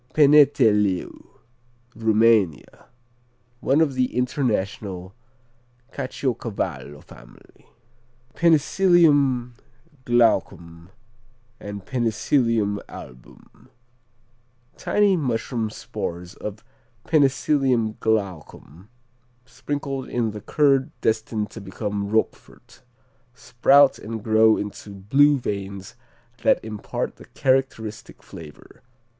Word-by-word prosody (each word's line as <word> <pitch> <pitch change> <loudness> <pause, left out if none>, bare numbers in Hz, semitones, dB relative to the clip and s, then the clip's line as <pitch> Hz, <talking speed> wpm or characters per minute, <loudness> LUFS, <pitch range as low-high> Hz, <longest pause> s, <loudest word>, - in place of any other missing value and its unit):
Peneteleu 130 - +3 0.7
Rumania 110 -7 +1 0.7
One 140 +5 +2
of 150 -4 +1
the 130 -1 -1
international 100 -7 -2 0.8
Caciocavallo 100 - -4
family. - - -18 0.7
Penicillium 155 -6 +3 0.5
Glaucum 90 -8 0 0.7
and 100 -2 -8
Penicillium 115 -3 0
Album 60 -1 -14 1.1
Tiny 205 -2 +2
mushroom 120 -6 -2
spores 90 -3 -7
of 105 +2 -8 0.4
Penicillium 135 -6 +1
Glaucum 95 -4 -4 0.6
sprinkled 135 0 -5
in 115 -3 -1
the 105 0 -8
curd 135 +1 +2
destined 110 -1 -1
to 110 - -9
become 100 +1 -4
Roquefort, 110 +1 -3 0.5
sprout 135 +2 +3
and 110 0 -7
grow 110 0 +4
into 105 0 -7
"blue" 135 +10 +3
veins 100 -3 -6 0.5
that - - +3
impart 110 -2 -5
the - - -14
characteristic 130 -5 -2
flavor. 75 -3 -13
110 Hz, 80 wpm, -23 LUFS, 100-135 Hz, 1.1 s, grow